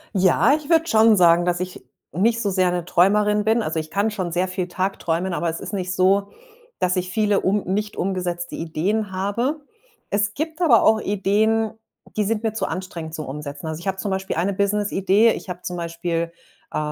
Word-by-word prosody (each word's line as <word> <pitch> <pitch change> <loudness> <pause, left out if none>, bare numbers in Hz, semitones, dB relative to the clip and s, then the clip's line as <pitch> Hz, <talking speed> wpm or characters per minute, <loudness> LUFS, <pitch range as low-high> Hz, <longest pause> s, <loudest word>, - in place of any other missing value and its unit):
Ja, 190 +8 +4
ich 300 -1 -7
würde 330 -1 +4
schon 220 -7 +5
sagen, 175 -1 +5
dass 175 0 0
ich 185 -5 -6 0.3
nicht 225 +9 +1
so 205 -4 0
sehr 185 -1 +2
'ne 175 -1 -2
Träumerin 210 +4 +3
bin. 220 +2 +2
Also, 160 -4 -2
ich 155 0 -6
kann 205 +5 0
schon 185 -5 -3
sehr 180 +2 0
viel 185 -1 -3
tagträumen, 185 -1 -2
aber 170 0 -1
es 160 - -4
ist - - -7
nicht 185 -2 -2
so, 195 +2 +2 0.5
dass 180 +1 +1
ich 180 0 -2
viele 210 0 +2
um 200 +2 +1
nicht 210 +3 -2
umgesetzte 175 -2 -2
Ideen 190 +6 -2
habe. 235 +11 -1 0.5
Es 210 +1 0
gibt 320 +3 -4
aber 245 -10 +5
auch 220 0 +4
Ideen, 210 +2 +1 0.4
die 210 - +1
sind 220 +1 -1
mir 220 -2 0
zu 220 - -2
anstrengend 165 -2 -6
zum 155 - -5
Umsetzen. 140 +1 -7
Also, 160 0 -4
ich 175 - -8
habe 190 - -1
zum 195 +1 -3
Beispiel 190 0 -2
eine 185 +5 0
Businessidee 200 +2 +2
ich 195 - -6
habe 180 0 -6
zum 180 - -4
Beispiel, 170 0 -3 0.4
äh, - - -3
190 Hz, 200 wpm, -22 LUFS, 175-210 Hz, 0.5 s, schon